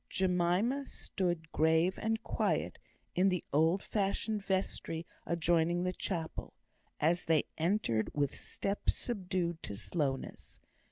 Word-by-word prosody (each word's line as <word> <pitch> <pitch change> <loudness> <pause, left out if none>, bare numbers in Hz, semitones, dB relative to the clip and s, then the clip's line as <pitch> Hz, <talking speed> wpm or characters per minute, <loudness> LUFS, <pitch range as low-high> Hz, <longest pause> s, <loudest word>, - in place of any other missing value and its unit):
Jemima 190 +9 +2
stood 175 -4 -2
grave 160 +3 +3
and 225 +1 0
quiet - - 0 0.3
in 190 +2 +4
the 180 -2 0
old 160 +6 +3
fashioned 210 +1 0
vestry 185 -4 -1 0.2
adjoining 170 +1 +2
the 180 0 0
chapel, 165 -4 -4 0.4
as 170 +4 +2
they 160 -2 +4
entered 160 - +1
with 145 -2 0
steps 200 +1 -1
subdued 180 -7 -2
to 100 - -4
slowness. 135 - -3
175 Hz, 115 wpm, -33 LUFS, 160-195 Hz, 0.4 s, in